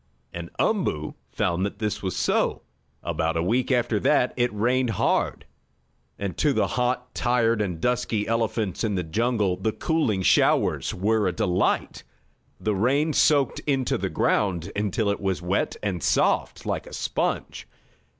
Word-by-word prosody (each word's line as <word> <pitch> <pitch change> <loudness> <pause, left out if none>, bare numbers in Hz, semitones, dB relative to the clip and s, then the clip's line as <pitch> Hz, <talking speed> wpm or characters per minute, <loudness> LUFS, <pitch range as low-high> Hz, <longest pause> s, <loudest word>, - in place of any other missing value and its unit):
And 85 0 -6
Umboo 125 - 0 0.2
found 90 +1 -1
that 100 0 -3
this 105 -1 -2
was 95 -3 -3
so. - - 0 0.4
About 80 0 -1
a 80 - 0
week 120 +8 +1
after 120 -4 +1
that 125 +1 +2
it 120 0 +1
rained 120 +4 +1
hard, 105 - 0 0.7
and 100 -2 -4
to 150 -2 +3
the - - +2
hot, 125 0 -1
tired 115 -2 +1
and 90 -5 -2
dusty 120 -2 0
elephants 115 -3 -1
in 105 -3 0
the 90 - -1
jungle 105 +2 0
the 110 +4 -1
cooling 115 - 0
showers - - +3
were 105 +2 +1
a - - +1
delight. 90 0 0 0.6
The 110 - 0
rain 140 +10 +1
soaked 145 -4 +3
into 135 -3 +1
the - - -2
ground, 95 -3 0
until 105 +1 0
it 100 - -4
was 95 -2 -1
wet 90 +2 -1
and 95 -5 -2
soft, - - +1
like - - -3
a - - -11
sponge. - - -2
105 Hz, 155 wpm, -25 LUFS, 95-125 Hz, 0.7 s, to